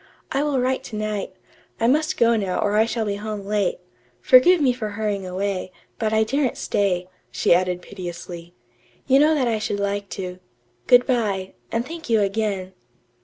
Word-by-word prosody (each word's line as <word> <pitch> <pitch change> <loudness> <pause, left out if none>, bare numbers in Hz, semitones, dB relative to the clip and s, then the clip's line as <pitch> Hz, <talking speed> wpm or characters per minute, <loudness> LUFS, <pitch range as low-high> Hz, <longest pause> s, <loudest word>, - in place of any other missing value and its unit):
"I 275 - +1
will 290 -3 0
write 260 +1 0
to 220 - -7
night. 210 -3 -3 0.4
I 225 - +1
must 305 +6 +2
go 235 0 +4
now 195 -4 -1
or 205 0 +1
I 220 +1 +5
shall 230 -1 -2
be 200 -1 -2
home 210 -1 -5
late. 205 -2 0 0.4
Forgive 295 +8 +6
me 265 -4 +3
for 225 -4 -4
hurrying 205 -2 -3
away, 185 0 -3 0.3
but 220 -2 0
I 220 0 +3
daren't 265 +3 0
stay," 180 -3 0 0.2
she - - +2
added 180 0 0
piteously. 175 -1 -8 0.5
"You 270 0 +5
know 310 +2 +5
that 265 -4 +1
I 225 -2 0
should 210 -1 -2
like 200 0 -2
to. 180 -1 -5 0.5
Good 245 0 +6
bye, 205 -7 -1 0.2
and 230 +1 -1
thank 320 -1 -8
you 225 -1 +4
again." 195 -2 -1
215 Hz, 180 wpm, -23 LUFS, 195-245 Hz, 0.5 s, Forgive